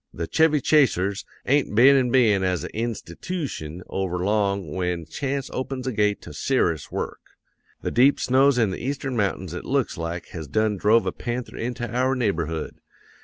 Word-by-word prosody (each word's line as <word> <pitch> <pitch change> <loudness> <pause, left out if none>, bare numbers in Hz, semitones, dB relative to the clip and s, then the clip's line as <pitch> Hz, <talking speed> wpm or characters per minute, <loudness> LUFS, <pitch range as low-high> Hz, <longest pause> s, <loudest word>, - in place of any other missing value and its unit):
"'The 85 - -3
Chevy 160 -2 +3
Chasers 105 - +2 0.2
ain't 140 -5 +1
been 130 +5 +7
in 130 -2 +3
bein' 115 -6 +4
as 90 -4 0
a - - -8
institootion 110 - -4
over 95 -2 -2
long 100 -3 0
when 90 -2 -2
chance 135 - -3
opens 130 0 -4
a 130 - -1
gate 105 -2 0
to - - -10
ser'ous 85 - 0
work. - - -4 0.6
The - - -1
deep 130 +4 +4
snows 135 +1 +3
in 110 -5 +2
the 95 - -6
Eastern 135 0 -3
mountains 95 -5 -1
it 90 - -5
looks 130 -8 -1
like 85 +1 -4
has 80 -3 -7
done 110 +8 +1
drove 110 +4 +4
a - - 0
panther 120 +1 -5
into 120 0 -3
our 130 +2 +1
neighborhood. 85 - -2
110 Hz, 170 wpm, -24 LUFS, 90-130 Hz, 0.6 s, been